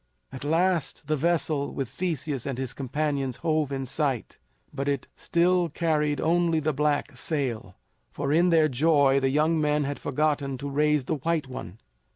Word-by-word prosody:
At 130 Hz, -, -8 dB
last 170 Hz, +2 st, +1 dB
the 155 Hz, +1 st, 0 dB
vessel 155 Hz, -2 st, 0 dB
with 135 Hz, -, -2 dB
Theseus 145 Hz, -2 st, -3 dB
and 135 Hz, -3 st, -3 dB
his 130 Hz, -1 st, -3 dB
companions 140 Hz, -1 st, -2 dB
hove 155 Hz, -3 st, 0 dB
in 135 Hz, -1 st, -3 dB
sight, 135 Hz, -2 st, -2 dB, 0.3 s
but 140 Hz, +1 st, -3 dB
it 140 Hz, -3 st, -1 dB
still 175 Hz, 0 st, +2 dB
carried 150 Hz, -2 st, 0 dB
only 170 Hz, 0 st, +2 dB
the 155 Hz, 0 st, 0 dB
black 145 Hz, +1 st, 0 dB
sail, 120 Hz, -, -3 dB, 0.4 s
for 145 Hz, 0 st, -2 dB
in 175 Hz, +3 st, +4 dB
their 160 Hz, -2 st, +5 dB
joy 140 Hz, 0 st, +3 dB
the 135 Hz, 0 st, +1 dB
young 155 Hz, +3 st, +2 dB
men 150 Hz, 0 st, +2 dB
had 145 Hz, 0 st, -3 dB
forgotten 145 Hz, -1 st, -1 dB
to 140 Hz, +3 st, -5 dB
raise 150 Hz, -1 st, +2 dB
the 150 Hz, -, -1 dB
white 160 Hz, +1 st, -1 dB
one. 105 Hz, -7 st, -8 dB
150 Hz, 170 wpm, -26 LUFS, 135-160 Hz, 0.4 s, their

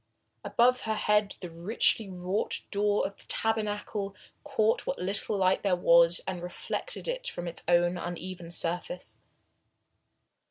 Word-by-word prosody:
Above 250 Hz, +1 st, +3 dB
her 220 Hz, -1 st, 0 dB
head 210 Hz, -1 st, +2 dB
the 180 Hz, -, -5 dB
richly 195 Hz, +4 st, +1 dB
wrought 185 Hz, +2 st, -2 dB
door 205 Hz, 0 st, +2 dB
of 200 Hz, -, -5 dB
the -, -, -11 dB
tabernacle 210 Hz, -2 st, -1 dB, 0.3 s
caught 225 Hz, -6 st, +1 dB
what -, -, -1 dB
little 200 Hz, +3 st, 0 dB
light 190 Hz, 0 st, +3 dB
there 195 Hz, -3 st, +2 dB
was 170 Hz, -1 st, +5 dB
and 185 Hz, -2 st, -4 dB
reflected 180 Hz, -, -5 dB
it -, -, -2 dB
from 175 Hz, -, -4 dB
its 170 Hz, -, -4 dB
own 175 Hz, +1 st, +3 dB
uneven 175 Hz, 0 st, -6 dB
surface. 175 Hz, +1 st, -4 dB
195 Hz, 135 wpm, -29 LUFS, 175-215 Hz, 0.3 s, was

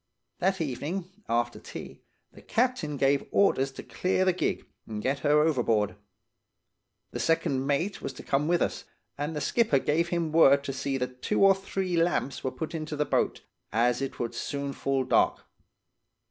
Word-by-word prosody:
"That 190 Hz, +1 st, +1 dB
evening, 165 Hz, +6 st, -3 dB, 0.2 s
after 120 Hz, +1 st, 0 dB
tea, -, -, -9 dB, 0.3 s
the -, -, -15 dB
captain 230 Hz, -, 0 dB
gave 140 Hz, +1 st, +2 dB
orders 135 Hz, -9 st, +3 dB
to -, -, -8 dB
clear 185 Hz, 0 st, 0 dB
the 185 Hz, -, +3 dB
gig 180 Hz, -, -1 dB, 0.2 s
and 110 Hz, -1 st, -5 dB
get 135 Hz, +6 st, -1 dB
her 150 Hz, +1 st, +4 dB
overboard. 115 Hz, -9 st, +1 dB, 1.2 s
The -, -, -5 dB
second 135 Hz, -5 st, +1 dB
mate 165 Hz, +8 st, 0 dB
was -, -, -4 dB
to -, -, -10 dB
come 140 Hz, +2 st, 0 dB
with 175 Hz, 0 st, +3 dB
us, -, -, -3 dB, 0.3 s
and 150 Hz, +3 st, -3 dB
the 150 Hz, -, -2 dB
skipper 220 Hz, -, +2 dB
gave 155 Hz, +5 st, +1 dB
him 170 Hz, -2 st, -1 dB
word 140 Hz, -3 st, +6 dB
to 135 Hz, -, -4 dB
see 135 Hz, +1 st, -2 dB
that 125 Hz, 0 st, -4 dB
two -, -, +1 dB
or 195 Hz, -, +8 dB
three 190 Hz, -2 st, -2 dB
lamps 165 Hz, -5 st, 0 dB
were 130 Hz, -, 0 dB
put 130 Hz, +6 st, -6 dB
into 155 Hz, -1 st, -4 dB
the 150 Hz, 0 st, 0 dB
boat, -, -, 0 dB, 0.3 s
as 120 Hz, +3 st, +2 dB
it 135 Hz, -, -4 dB
would 120 Hz, 0 st, -3 dB
soon 140 Hz, +3 st, -3 dB
fall 135 Hz, -1 st, 0 dB
dark. -, -, +2 dB
145 Hz, 175 wpm, -28 LUFS, 135-170 Hz, 1.2 s, or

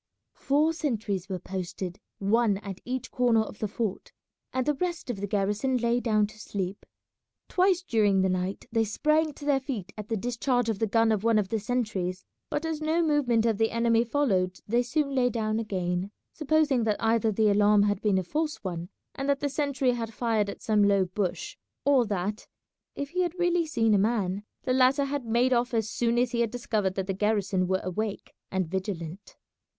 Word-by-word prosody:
Four 300 Hz, +4 st, +2 dB
sentries 215 Hz, -, -2 dB
were 190 Hz, -, -2 dB
posted, 180 Hz, 0 st, -5 dB, 0.2 s
one 205 Hz, +1 st, +2 dB
at 195 Hz, -2 st, -7 dB
each 255 Hz, 0 st, -4 dB
corner 240 Hz, -3 st, +3 dB
of 215 Hz, -1 st, -7 dB
the 215 Hz, -, -1 dB
fort, 210 Hz, -1 st, -4 dB, 0.4 s
and 255 Hz, -1 st, -1 dB
the 295 Hz, -, +2 dB
rest 345 Hz, -3 st, -3 dB
of 200 Hz, -5 st, -6 dB
the 205 Hz, -, -2 dB
garrison 205 Hz, +6 st, 0 dB
lay 240 Hz, 0 st, +1 dB
down 215 Hz, -3 st, +2 dB
to 215 Hz, +1 st, -12 dB
sleep. 195 Hz, -2 st, -5 dB, 0.6 s
Twice 370 Hz, -1 st, +2 dB
during 210 Hz, -, +2 dB
the 190 Hz, -, +3 dB
night 185 Hz, +1 st, -2 dB
they 225 Hz, -1 st, +2 dB
sprang 305 Hz, +8 st, +1 dB
to 285 Hz, -, -10 dB
their 285 Hz, -2 st, +3 dB
feet 240 Hz, -9 st, -5 dB
at 210 Hz, -1 st, -8 dB
the 225 Hz, -, 0 dB
discharge 245 Hz, +2 st, 0 dB
of 215 Hz, -3 st, -1 dB
the 225 Hz, -, +1 dB
gun 225 Hz, +1 st, +3 dB
of 215 Hz, -2 st, 0 dB
one 230 Hz, -1 st, +4 dB
of 200 Hz, -3 st, 0 dB
the 225 Hz, -, 0 dB
sentries, 205 Hz, -6 st, -2 dB, 0.2 s
but 295 Hz, -, -2 dB
as 320 Hz, -1 st, -3 dB
no 320 Hz, +2 st, +1 dB
movement 265 Hz, -8 st, +2 dB
of 225 Hz, -2 st, +1 dB
the 225 Hz, 0 st, +3 dB
enemy 230 Hz, 0 st, +2 dB
followed 200 Hz, -8 st, 0 dB
they 235 Hz, +3 st, +2 dB
soon 280 Hz, +3 st, -1 dB
lay 250 Hz, -2 st, +3 dB
down 220 Hz, -1 st, -1 dB
again, 185 Hz, -3 st, -2 dB, 0.2 s
supposing 305 Hz, -5 st, +2 dB
that 215 Hz, -2 st, +1 dB
either 225 Hz, 0 st, +2 dB
the 215 Hz, +1 st, +3 dB
alarm 205 Hz, 0 st, +5 dB
had 205 Hz, -1 st, 0 dB
been 205 Hz, -3 st, +2 dB
a 190 Hz, -, 0 dB
false 305 Hz, -, -1 dB
one, 175 Hz, -2 st, -4 dB, 0.2 s
and 275 Hz, +1 st, -3 dB
that 280 Hz, -1 st, +2 dB
the 285 Hz, -, -1 dB
sentry 280 Hz, -3 st, 0 dB
had 230 Hz, -2 st, -3 dB
fired 225 Hz, -4 st, +1 dB
at -, -, -8 dB
some 210 Hz, -2 st, +3 dB
low 200 Hz, -2 st, +4 dB
bush, 180 Hz, -2 st, -3 dB, 0.3 s
or 270 Hz, -5 st, +4 dB
that, 205 Hz, +1 st, -3 dB, 0.5 s
if 280 Hz, -1 st, -4 dB
he 365 Hz, +3 st, -1 dB
had 355 Hz, 0 st, -1 dB
really 350 Hz, -1 st, +2 dB
seen 225 Hz, -8 st, +2 dB
a 205 Hz, -, +4 dB
man, 200 Hz, -3 st, 0 dB, 0.2 s
the 255 Hz, -, 0 dB
latter 260 Hz, +2 st, +4 dB
had 280 Hz, -2 st, -3 dB
made 240 Hz, +3 st, +2 dB
off 240 Hz, 0 st, +1 dB
as 220 Hz, -2 st, +1 dB
soon 235 Hz, 0 st, +1 dB
as 245 Hz, 0 st, +2 dB
he 235 Hz, -, -1 dB
had 230 Hz, -, +1 dB
discovered 215 Hz, -5 st, -1 dB
that 190 Hz, -, -2 dB
the 195 Hz, -, -2 dB
garrison 200 Hz, -2 st, +1 dB
were 190 Hz, 0 st, 0 dB
awake 205 Hz, +3 st, -4 dB, 0.2 s
and 190 Hz, -2 st, -1 dB
vigilant. 190 Hz, 0 st, -5 dB
225 Hz, 205 wpm, -27 LUFS, 200-260 Hz, 0.6 s, alarm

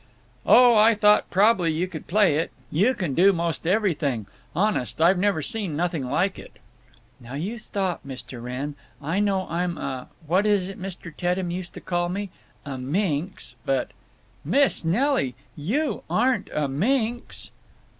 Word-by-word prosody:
"Oh, 245 Hz, -1 st, +7 dB
I 220 Hz, +1 st, +6 dB
thought 210 Hz, 0 st, +4 dB
prob'ly 195 Hz, -4 st, +3 dB
you 165 Hz, +4 st, -1 dB
could 165 Hz, -4 st, -8 dB
play 190 Hz, -5 st, +3 dB
it. 165 Hz, -, 0 dB, 0.2 s
You 210 Hz, -, +3 dB
can 175 Hz, -10 st, -2 dB
do 190 Hz, +7 st, +6 dB
'most 170 Hz, -2 st, -2 dB
everything. 165 Hz, -, +1 dB, 0.3 s
Honest, 175 Hz, -, 0 dB
I've 175 Hz, +3 st, +4 dB
never 190 Hz, -5 st, +1 dB
seen 205 Hz, -5 st, -2 dB
nothing 160 Hz, -5 st, -1 dB
like 185 Hz, +8 st, 0 dB
it." -, -, -12 dB, 0.7 s
"Now 120 Hz, +3 st, -9 dB
you 200 Hz, +11 st, -4 dB
stop, 190 Hz, -4 st, -2 dB
Mr. 130 Hz, -2 st, -8 dB
Wrenn. 130 Hz, +4 st, -4 dB, 0.3 s
I 165 Hz, +7 st, -1 dB
know 195 Hz, -2 st, +1 dB
I'm 175 Hz, +1 st, -2 dB
a—what 160 Hz, +8 st, -2 dB
was 200 Hz, -3 st, +2 dB
it 195 Hz, -, -9 dB
Mr. 180 Hz, -4 st, -7 dB
Teddem 180 Hz, +1 st, -1 dB
used 180 Hz, 0 st, -5 dB
to -, -, -8 dB
call 175 Hz, -1 st, -1 dB
me? 195 Hz, +1 st, -4 dB, 0.3 s
A 135 Hz, -2 st, -5 dB
minx. 150 Hz, -, -2 dB
But—" 135 Hz, 0 st, 0 dB, 0.5 s
"Miss 270 Hz, -, +2 dB
Nelly! 190 Hz, -, +1 dB, 0.2 s
You 250 Hz, -, -1 dB
aren't 245 Hz, -5 st, +1 dB
a 150 Hz, -2 st, 0 dB
minx!" 230 Hz, -, -1 dB
180 Hz, 155 wpm, -25 LUFS, 150-205 Hz, 0.7 s, Oh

